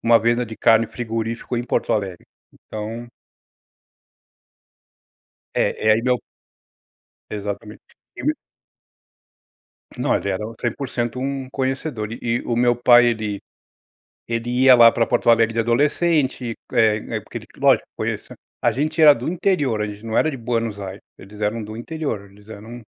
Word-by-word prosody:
uma 115 0 +5
venda 120 +1 +1
de 110 - -9
carne, 115 0 +4
frigorífico 115 +1 -4
em 120 - -2
Porto - - 0
Alegre. 95 -4 -3 0.3
Então 110 +3 -7 2.5
É 110 - 0
é 110 - +8
aí 110 - +1
meu 125 0 +1 1.1
Exatamente 105 +1 -6 0.4
e - - -7
meu - - +2 1.6
Não, - - +1
ele 100 - -1
era 95 +3 -2 0.2
100% 120 0 -3
um 135 0 -3
conhecedor 130 -4 -2
e 115 0 -2
o 120 - 0
meu 120 0 +3
pai 120 0 +6
ele 110 -3 -1 0.9
ele 115 +1 -2
ia 130 +1 +6
lá 115 -1 +8
pra 115 - +1
Porto 120 -1 +2
Alegre 115 -1 +3
de 115 - +1
adolescente, 135 +1 +1 0.2
eh, 110 -3 +4 0.2
é - - -2
porque - - -8
ele - - -14
lógico - - +3
conheça - - -4 0.3
A 120 - +4
gente 155 +7 -1
era 150 -2 +9
do 120 0 -6
interior, 165 - 0
a 105 - 0
gente 105 +2 -9
não 110 0 -3
era 155 - +3
de 135 - -6
Buenos 115 -3 -2
Aires, 95 0 -7 0.2
eles 105 +2 -13
eram 105 +2 -1
do 110 +1 -8
interior, 120 -7 -5
eles 105 +2 -20
eram 110 +3 -9
115 Hz, 155 wpm, -21 LUFS, 110-125 Hz, 2.5 s, era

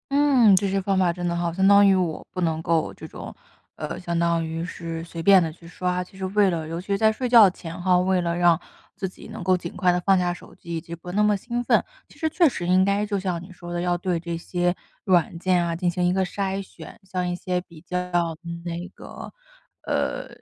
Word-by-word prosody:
嗯， 275 -7 +5
这 200 0 +1
些 195 0 0
方 195 0 +1
法 175 -2 +3
真 175 0 -5
的 170 - 0
好。 170 -1 -1
相 190 +2 +1
当 200 0 +7
于 195 - +5
我， 175 -4 -2
不 185 - -3
能 160 -2 0
够， 165 -1 0
这 - - -10
种 - - -9 0.4
呃， - - -5
相 170 -2 -3
当 170 -1 +1
于 160 +1 -4
是 165 -2 -6
随 165 -1 -7
便 195 0 +7
地 165 - 0
去 170 - -18
刷。 180 +1 -2
其 185 +1 -17
实 190 - -3
为 200 +1 +3
了 165 -3 -3
尤 165 +2 -4
其 185 - -18
是 200 -1 +1
在 220 +1 +4
睡 245 +3 -2
觉 230 -5 +8
前 175 -1 -8
哈， 180 0 +4
为 185 +1 +2
了 170 -1 -1
让 175 -2 +4 0.3
自 190 - -4
己 185 - -12
能 220 -1 -7
够 185 +1 +3
尽 170 -1 -6
快 180 - +1
地 180 - 0
放 190 +1 +4
下 175 -1 0
手 - - -13
机， 170 0 -7
以 165 - -3
及 165 - -9
不 180 +1 -8
那 210 +2 +3
么 210 -1 +3
兴 240 +4 -3
奋， - - +4 0.3
其 - - -19
实 320 - 0
确 335 0 +4
实 175 -8 -5
应 185 +1 +4
该 200 +2 +1
就 205 -1 -1
像 185 -3 -2
你 185 +2 -12
说 175 -1 -9
的 175 - -2
要 175 0 0
对 175 -1 -1
这 170 0 -4
些， 175 +1 -1 0.3
软 175 -3 +2
件 180 -1 +2
啊， 170 - -1
进 175 +1 0
行 180 +1 -1
一 175 - +3
个 190 +1 +1
筛 195 +1 -2
选， 195 - -12
像 180 -1 -1
一 - - -1
些 180 0 -2
比 170 -3 -16
较 180 +2 -4 0.5
那 170 0 -4
个 - - -10 0.6
呃， - - -1
180 Hz, 270 characters per minute, -24 LUFS, 170-195 Hz, 0.6 s, 觉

